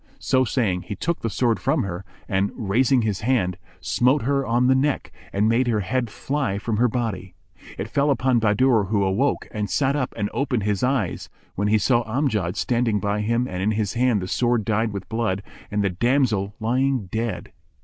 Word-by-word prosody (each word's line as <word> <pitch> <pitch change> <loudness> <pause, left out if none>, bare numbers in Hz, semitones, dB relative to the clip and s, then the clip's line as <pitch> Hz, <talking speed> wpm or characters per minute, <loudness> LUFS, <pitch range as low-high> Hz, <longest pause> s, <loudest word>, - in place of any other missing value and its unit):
So 130 -1 +2
saying, 110 -7 0
he 100 - -4
took 170 - -2
the 115 - -2
sword 115 +2 +1
from - - +1
her 90 -1 -5 0.2
and, 95 +1 0
raising 120 +3 +2
his 105 -3 -1
hand, 110 -7 +1 0.3
smote 125 - +2
her 140 +2 +1
on 120 0 +1
the 130 - +5
neck 135 +2 0 0.2
and 100 +2 +1
made 120 +3 +2
her 110 -3 +1
head 120 +4 -1
fly 135 -3 -2
from 105 +1 -2
her 125 +3 +4
body. 110 -6 -3 0.4
It - - -4
fell 140 +1 +1
upon 130 -3 +2
Bahadur 110 +1 +3
who 100 0 +1
awoke 100 +9 0
and 105 -2 -3
sat 140 0 +1
up 130 -4 -2
and 105 -2 0
opened 130 -6 -1
his 105 -1 0
eyes, 125 -7 -1 0.2
when 100 +2 -1
he 110 +1 +4
saw 120 +3 +2
Amjad 110 - -1
standing 115 -3 +1
by 105 0 -1
him 115 +3 0
and 90 -4 -4
in 105 +3 +1
his 105 -2 -1
hand 120 -5 +2
the - - -4
sword 120 0 +1
dyed 110 0 0
with 100 -2 -6
blood, 110 -4 -1 0.3
and 105 0 0
the 100 - +1
damsel 110 -1 +1
lying 130 +1 +1
dead. 105 -2 -4
115 Hz, 200 wpm, -23 LUFS, 100-125 Hz, 0.4 s, the